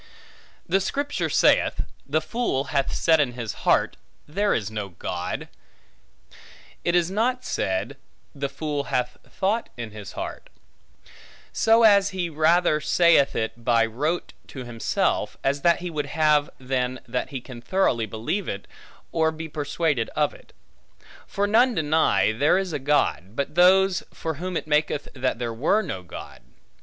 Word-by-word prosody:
The 190 +3 +3
Scripture 285 +9 -2
saith, - - +3 0.2
The 155 +3 +1
fool 190 - -1
hath 140 -1 +1
said 160 -1 +3
in 135 -5 +1
his 115 -4 -5 0.2
heart, - - +3 0.3
there 200 +7 0
is 110 -1 -1
no 105 -3 -4
God; 85 - -5 1.4
it 170 - +1
is 175 0 +2
not 250 +5 0
said, 95 0 -2 0.4
The 140 0 -3
fool 145 -2 -3
hath 125 0 -1
thought 205 +4 -1
in 115 -2 -6
his 105 -3 -9
heart; - - -6 1.0
so 225 +1 +4
as 200 -2 +6
he 180 -3 -3
rather 155 0 +3
saith 170 -3 +4
it, 115 +1 -3
by 115 -1 +3
rote 150 +10 -2
to 130 - -8
himself, 120 -2 -1
as 140 +1 0
that 170 +1 +3
he 175 -1 -4
would 150 -2 -3
have, 150 0 +2
than 130 -1 -2
that 125 +1 -2
he 135 - -4
can 125 -1 -11
thoroughly 120 -9 +1
believe 115 - -3
it, 100 0 -5 0.5
or 160 -1 +2
be 160 0 -7
persuaded 150 -4 -1
of - - +1
it. - - -17 0.8
For 200 - -1
none 230 +4 +4
deny, 155 - +2
there 145 +10 +3
is 190 -3 -2
a - - -1
God, 115 - 0
but 140 +2 -2
those, 185 +2 +5
for 160 - -4
whom 185 -1 -2
it - - -4
maketh 150 -1 0
that 130 -3 -1
there 120 -1 -3
were 155 - +2
no 95 - -5
God. 90 - -10
150 Hz, 155 wpm, -24 LUFS, 125-180 Hz, 1.4 s, as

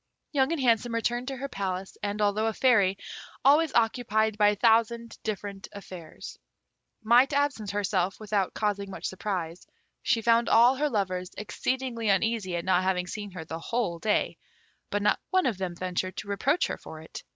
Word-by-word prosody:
Young 270 0 +2
and 335 - -1
Handsome 235 -2 +2
returned 240 +2 -1
to 270 -1 -4
her 275 +2 -4
palace, 190 -5 -4
and, 210 +1 -1
although 210 +2 +1
a 225 - 0
Fairy, 205 -6 +3 0.5
always 300 +2 +5
occupied 220 -2 +2
by 210 0 +5
a 210 - +1
thousand 230 +1 +2
different 205 -2 -5
affairs, 185 -5 -10 0.6
might 245 +5 +5
absent 280 -7 0
herself 195 -2 -1
without 205 -3 -1
causing 205 -2 -1
much 195 - -7
surprise, 180 -3 -4 0.3
she 230 -4 +1
found 235 +1 +3
all 240 +3 +6
her 300 +2 +1
lovers 185 -6 -2
exceedingly 235 +1 -2
uneasy 195 -2 +1
at 170 - -3
not 185 -1 +3
having 185 -1 0
seen 205 +2 -6
her 180 -4 -8
the 160 +1 -6
whole 180 -3 -2
day, 210 +4 0 0.5
but 205 0 -1
not 210 - +3
one 370 -1 +2
of 220 -7 0
them 180 -2 -3
ventured 185 +1 -3
to 210 - -6
reproach 280 - +1
her - - -4
for 155 - -10
it. 160 - -10
210 Hz, 175 wpm, -27 LUFS, 190-235 Hz, 0.6 s, all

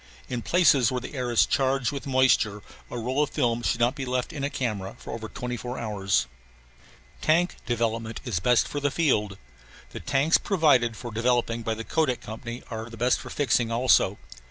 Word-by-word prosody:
In 125 -2 -3
places 140 -6 +4
where 125 - -1
the 125 - -8
air 125 -3 -2
is 120 - +4
charged 135 -2 +1
with 140 0 -6
moisture 130 -6 +2 0.3
a - - -5
roll 125 +5 -1
of 150 - +1
films 120 -4 0
should - - 0
not 120 +2 +3
be 140 -2 -5
left 125 -1 -2
in 145 - -5
a 140 - 0
camera 105 -9 -3
over 110 -1 -6
twenty 125 0 -4
four 125 +2 -6
hours. 100 - 0 1.0
Tank 170 +3 +2
development 115 -1 -1
is 110 -8 -1
best 120 +5 +3
for 145 - -4
the 145 0 +1
field. 105 - +1 0.5
The - - -7
tanks 140 +5 +2
provided 145 - +2
for 120 - -7
developing 115 0 +1
by 110 0 -2
the 115 - -6
Kodak 135 -2 0
Company 115 +3 -7
are 110 +1 -5
best 120 +2 +1
for - - -9
fixing 125 -5 +1
also. 120 +2 +3
120 Hz, 185 wpm, -26 LUFS, 115-135 Hz, 1.0 s, places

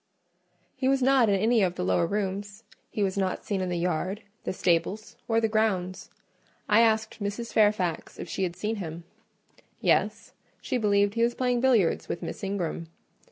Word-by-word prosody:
He 260 0 0
was 270 -1 +2
not 260 -4 +4
in 200 - +4
any 220 +3 +3
of 180 -2 +1
the - - -3
lower 90 -1 +2
rooms; 200 +1 -3 0.3
he 210 - -1
was 195 0 0
not 190 +2 -2
in 190 -2 0
the 175 - -1
yard, 180 +4 -2 0.2
the - - -1
stables, 190 +5 0
or 225 -1 +3
the 225 - +2
grounds. 190 -4 -1 0.6
I 210 +1 +5
asked 220 -1 +1
Mrs. 205 +4 -4
Fairfax 205 -6 +1
if - - -6
she 195 - -4
had 175 -2 -1
seen 215 +3 -2
him;—yes: 170 -2 -3 0.3
she 250 - -2
believed 205 -2 +2
he 230 - -1
was 235 +1 +2
playing 250 -2 +1
billiards 235 -10 +2
with - - -4
Miss - - -6
Ingram. 180 -4 -3
205 Hz, 170 wpm, -27 LUFS, 185-225 Hz, 0.6 s, I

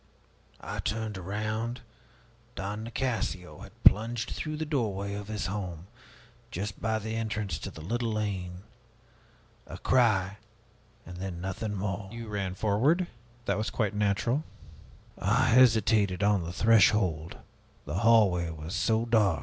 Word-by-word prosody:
I - - -5
turned 110 -1 -2
around 110 +5 -3 0.7
Don 105 +3 -4
Nicasio 115 -7 -3
had - - -14
plunged 115 +2 +4
through 155 0 -4
the 160 - -2
doorway 105 -9 -1
of 100 0 -5
his 110 -1 -3
home 90 -4 -4 0.6
just 100 -2 -5
by 110 -1 +1
the 110 +1 -4
entrance 105 -7 -2
to - - -5
the 80 - -10
little 115 +5 -1
lane. 95 -4 -3 1.0
A - - -7
cry! 100 -6 +2 0.7
then 90 0 -6
nothing 95 +3 -3
more!" 95 0 -3
"You 115 -1 -7
ran 100 -3 -2
forward? 120 - +2 0.4
That - - 0
was 110 - -1
quite 105 -4 -1
natural." 105 +7 +1 0.8
"I - - +3
hesitated 110 -5 +4
on 100 -4 +3
the 85 - -4
threshold 95 -5 +3 0.5
the 75 +6 -2
hallway 105 -7 +4
was 80 +2 -7
so 110 +3 +1
dark." 110 -7 +3
105 Hz, 135 wpm, -29 LUFS, 95-115 Hz, 1.0 s, plunged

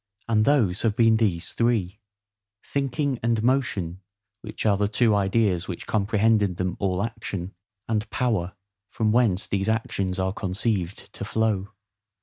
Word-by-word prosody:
And 110 -2 +3
those 115 -10 +2
have 110 -3 +1
been 115 -2 +4
these 95 -6 0
three:—THINKING 105 - -3
and 115 -1 +1
MOTION 105 -9 0 0.4
(which 105 +1 -6
are 105 -2 +4
the 100 +1 +1
two 110 +1 +2
ideas 100 -2 +1
which 90 - -6
comprehend 110 +1 +2
in 95 -3 0
them 90 0 -2
all 95 -1 0
action,) 105 -5 -5 0.3
and 110 -1 -1
POWER, 105 -8 -1 0.4
from 110 -1 0
whence 110 -5 +2
these 100 +1 -1
actions 100 -4 -1
are 95 0 0
conceived 95 -2 -2
to - - -6
flow. 110 -2 -1
105 Hz, 140 wpm, -25 LUFS, 95-115 Hz, 0.4 s, been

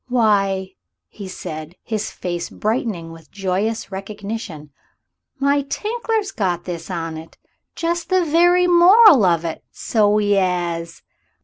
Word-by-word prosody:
"Why," 200 -6 +1 0.6
said 155 -3 -7
he, 230 - -8
his 215 -1 -1
face 175 -1 -5
brightening 210 -7 -3
with 165 -2 -14
joyous 200 +3 -2
recognition, 195 -5 -7 0.7
"my 280 +1 +2
Tinkler's 430 - -2
got 180 - -2
this 170 -1 -6
on 165 -3 -4
it 160 +1 -12 0.4
just 335 0 -2
the 370 -2 +2
very 350 +3 +4
moral 355 - +7
of 170 -2 +2
it, 165 - -5
so 210 -2 +1
'e 205 -1 +2
'as." 170 -2 -2
205 Hz, 125 wpm, -20 LUFS, 175-280 Hz, 0.7 s, moral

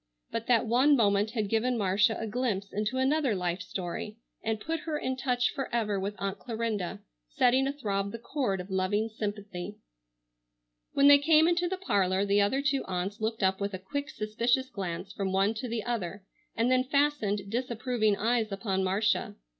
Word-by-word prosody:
But 230 0 -3
that 240 -1 +4
one 255 +6 +4
moment 205 -2 +3
had 215 -3 -2
given 235 +4 +1
Marcia 210 +2 +2
a 225 - -3
glimpse 210 -3 -2
into 215 +5 -1
another 265 -2 +2
life 180 0 -2
story 185 +3 -5 0.3
and 220 -1 -1
put 325 +7 -3
her 310 -1 -3
in 260 -2 -2
touch 250 -1 0
forever 230 -7 -1
with 200 +2 -3
Aunt 195 0 -3
Clarinda, 220 -5 -3 0.3
setting 255 - +3
athrob 200 -8 -2
the 230 - -5
chord 235 -5 -2
of 180 +2 -7
loving 200 +4 0
sympathy. 205 -3 -5 1.2
When 280 0 +5
they 285 0 +9
came 315 +2 +5
into 350 +1 +2
the 380 - -2
parlor 195 - +1
the 200 0 +3
other 265 +8 +1
two 275 -2 +1
aunts 190 +4 -3
looked 220 -1 -1
up 190 +1 +2
with 200 -1 -2
a - - -3
quick, 285 +10 -4
suspicious 235 +5 0
glance 190 0 -5
from 195 -1 -2
one 195 +3 +2
to 230 +3 -5
the 230 -2 -3
other 205 -5 -3 0.3
and 235 +3 +2
then 255 0 +4
fastened 255 -8 0
disapproving 235 -2 0
eyes 225 0 +1
upon 195 -1 -1
Marcia. 200 +3 0
220 Hz, 180 wpm, -29 LUFS, 200-255 Hz, 1.2 s, they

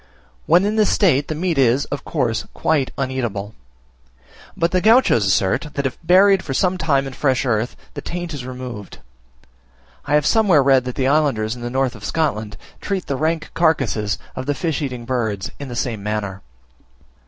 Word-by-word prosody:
When 175 +4 +5
in 215 +1 0
this 215 -2 +3
state 150 -9 +3
the 155 - -3
meat 165 -2 -1
is, 130 +2 +3
of 145 - -4
course, 110 -2 -1
quite 145 -5 +1
uneatable; 120 -7 -3 1.0
but 170 0 +1
the 185 - +2
Gauchos 220 - +4
assert, 95 - +1
that 140 - -2
if 130 - -3
buried 190 +2 +5
for 135 - -4
some 185 +4 +1
time 140 -4 +1
in 135 - -6
fresh 130 -1 0
earth, 115 -1 0 0.2
the - - -6
taint 175 -1 -5
is 140 -4 -5
removed. 125 -5 -8 1.1
I 145 - +1
have 150 -1 +2
somewhere 195 -10 +4
read 135 -2 +4
that 125 - -4
the 130 - 0
islanders 135 -7 +1
in 120 - -10
the 120 - -4
north 130 0 0
of 110 -3 -13
Scotland 110 -3 -2 0.2
treat 195 -3 -3
the 140 - -2
rank 160 +3 -1
carcasses 135 -10 +1 0.2
of 130 - -5
the 145 - 0
fish 160 -2 -2
eating 125 -4 -4
birds 110 -6 -2
in 140 - -6
the 120 - -7
same 120 -4 -2
manner. 100 -2 -3
135 Hz, 185 wpm, -20 LUFS, 120-160 Hz, 1.1 s, When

